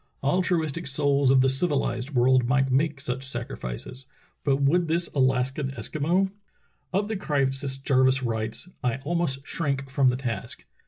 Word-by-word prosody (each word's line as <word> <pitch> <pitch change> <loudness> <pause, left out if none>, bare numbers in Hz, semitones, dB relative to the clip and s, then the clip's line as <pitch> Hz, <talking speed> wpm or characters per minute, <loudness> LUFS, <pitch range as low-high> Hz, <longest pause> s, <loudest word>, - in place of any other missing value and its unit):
Al 145 +7 +2
truistic 165 -3 -1
souls 140 -1 +2
of 130 0 +6
the 135 - +4
civilized 135 -2 0
world 125 0 +4
might 135 +1 +2
make 145 +2 +1
such 130 -1 -3
sacrifices, 120 - -6 0.4
but 140 -2 +3
would 150 +6 +2
this 170 +2 +1
Alaskan 130 +1 +1
Eskimo.'' 175 +8 0 0.6
Of 200 +2 0
the 220 - -2
crisis 135 -5 -1
Jarvis 130 -1 +2
writes: 110 +4 -2 0.2
*T 125 -2 +1
almost 145 -4 -1
shrank 140 -4 -2
from 135 -1 +3
the 125 0 +2
task. 125 -4 -5
135 Hz, 150 wpm, -26 LUFS, 130-150 Hz, 0.6 s, of